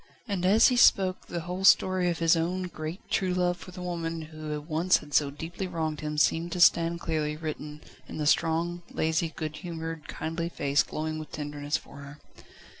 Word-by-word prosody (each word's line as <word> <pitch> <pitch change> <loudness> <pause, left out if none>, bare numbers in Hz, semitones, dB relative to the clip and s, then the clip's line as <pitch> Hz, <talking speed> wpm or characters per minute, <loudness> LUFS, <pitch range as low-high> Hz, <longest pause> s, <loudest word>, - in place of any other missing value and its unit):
And 185 -4 0
as 220 +6 +6
he 250 - +1
spoke 190 -5 +4
the 170 - -4
whole 180 +3 -5
story 185 -2 +5
of 170 - -1
his 165 0 +4
own 175 +3 -1
great, 165 0 -6
true 185 -2 0
love 180 -1 +1
for - - -11
the 180 0 -8
woman 165 -2 -3
who 155 -1 -6
once 160 +4 +2
had 145 -1 -12
so 145 -2 +3
deeply 165 +6 -6
wronged 160 -3 -3
him 150 0 -4
seemed 165 +3 +2
to 180 - -3
stand 170 -1 +4
clearly 155 -2 -2
written 150 -1 -6 0.3
in - - -7
the 150 - -2
strong, 165 +3 +1
lazy, 160 +1 0
good 155 -1 -4
humoured, 165 -1 -6
kindly 165 +1 -3
face 140 -3 +1
glowing 155 0 -4
with 155 - -9
tenderness 145 0 -3
for - - -14
her. 140 +1 -10
165 Hz, 190 wpm, -28 LUFS, 155-175 Hz, 0.3 s, as